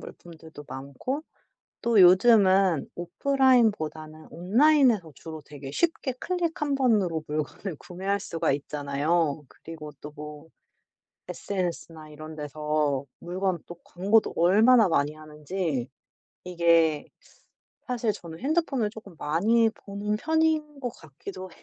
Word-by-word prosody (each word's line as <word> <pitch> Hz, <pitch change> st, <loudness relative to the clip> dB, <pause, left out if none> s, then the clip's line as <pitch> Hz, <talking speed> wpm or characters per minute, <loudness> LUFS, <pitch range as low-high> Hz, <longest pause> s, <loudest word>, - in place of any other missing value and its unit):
물품들도 160 Hz, -3 st, -12 dB
많고 140 Hz, -, -5 dB, 0.6 s
또 230 Hz, -3 st, +3 dB
요즘은 190 Hz, -, +5 dB
오프라인보다는 175 Hz, -, +1 dB
온라인에서 225 Hz, -, +3 dB
주로 160 Hz, -1 st, -9 dB
되게 140 Hz, -2 st, -9 dB
쉽게 305 Hz, -, -1 dB
클릭 350 Hz, -4 st, -2 dB
1 290 Hz, -2 st, 0 dB
번으로 205 Hz, -, +1 dB
물건을 155 Hz, +4 st, -4 dB
구매할 190 Hz, +4 st, -3 dB
수가 165 Hz, -7 st, -1 dB
있잖아요. 145 Hz, +2 st, -1 dB
그리고 155 Hz, -2 st, -10 dB
또 150 Hz, -, -8 dB
뭐 150 Hz, +1 st, -9 dB, 0.8 s
SNS나 170 Hz, -5 st, -4 dB
이런 155 Hz, +1 st, -10 dB
데서 150 Hz, -2 st, -1 dB
물건 180 Hz, 0 st, -2 dB
또 175 Hz, -, -8 dB
광고도 200 Hz, +5 st, +1 dB
얼마나 215 Hz, +5 st, +5 dB
많이 145 Hz, -2 st, +1 dB
하는지 155 Hz, -2 st, -4 dB, 0.6 s
이게 170 Hz, -3 st, +2 dB, 0.8 s
사실 240 Hz, -3 st, 0 dB
저는 165 Hz, -3 st, -10 dB
핸드폰을 275 Hz, -5 st, 0 dB
조금 205 Hz, -5 st, -12 dB
많이 220 Hz, +11 st, +2 dB
보는 210 Hz, 0 st, -4 dB
편인 315 Hz, 0 st, 0 dB
것 245 Hz, -, -2 dB
같기도 185 Hz, -, -10 dB
175 Hz, 260 characters per minute, -26 LUFS, 155-225 Hz, 0.8 s, 요즘은